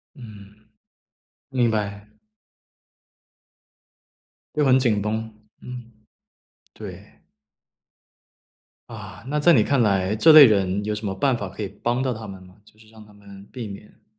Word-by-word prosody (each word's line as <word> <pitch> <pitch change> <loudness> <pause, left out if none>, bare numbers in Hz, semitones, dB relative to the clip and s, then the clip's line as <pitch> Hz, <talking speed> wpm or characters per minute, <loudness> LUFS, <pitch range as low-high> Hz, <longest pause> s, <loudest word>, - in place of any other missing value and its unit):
嗯。 105 -4 -14 0.8
明 125 -3 +1
白。 105 -1 -4 2.5
就 150 - +1
很 130 -2 +4
紧 115 -6 +1
绷， 110 +2 -3 0.3
嗯。 125 -2 -10 0.8
对。 - - -10 1.8
啊， - - -10
那 150 +2 -1
在 170 +3 +5
你 110 - +4
看 140 +2 +1
来， 100 -2 +1
这 160 +9 +6
类 155 -2 +11
人 100 -3 +1
有 105 +1 -2
什 105 +1 -6
么 95 -1 -3
办 125 +5 +1
法 100 - -5
可 95 +4 -7
以 - - -3
帮 120 +6 -2
到 130 -2 -1
他 110 -1 -9
们 95 -1 -10
吗？ 90 0 -18
就 110 - -24
是 110 0 -20
让 110 -1 -15
他 105 - -19
们 100 -1 -15
避 120 -4 -7
免。 105 +2 -13
110 Hz, 155 characters per minute, -23 LUFS, 100-125 Hz, 2.5 s, 类